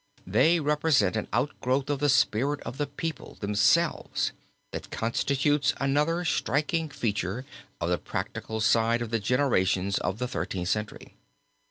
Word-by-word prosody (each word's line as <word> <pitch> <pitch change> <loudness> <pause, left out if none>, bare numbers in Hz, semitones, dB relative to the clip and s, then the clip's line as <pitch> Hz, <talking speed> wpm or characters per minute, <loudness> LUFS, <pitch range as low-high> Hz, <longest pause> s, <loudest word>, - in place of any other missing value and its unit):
They 155 - +4
represent 150 - +2
an 110 - -2
outgrowth 130 +2 0
of 140 - -1
the 145 +1 +2
spirit 135 +2 +2
of 130 - -7
the 145 - 0
people 160 +3 -5
themselves, 105 +12 +2 0.4
that - - -6
constitutes 140 +5 +1
another 150 +6 +1
striking 155 +1 0
feature 105 -2 -2 0.3
of 85 - -1
the 90 - +1
practical 110 +7 -4
side 115 +1 +3
of 115 - -7
the 115 - +1
generations 100 -5 +1
of 95 - -2
the 125 +1 -2
Thirteenth 90 -3 -3
Century. 105 0 -3
125 Hz, 140 wpm, -27 LUFS, 105-145 Hz, 0.4 s, They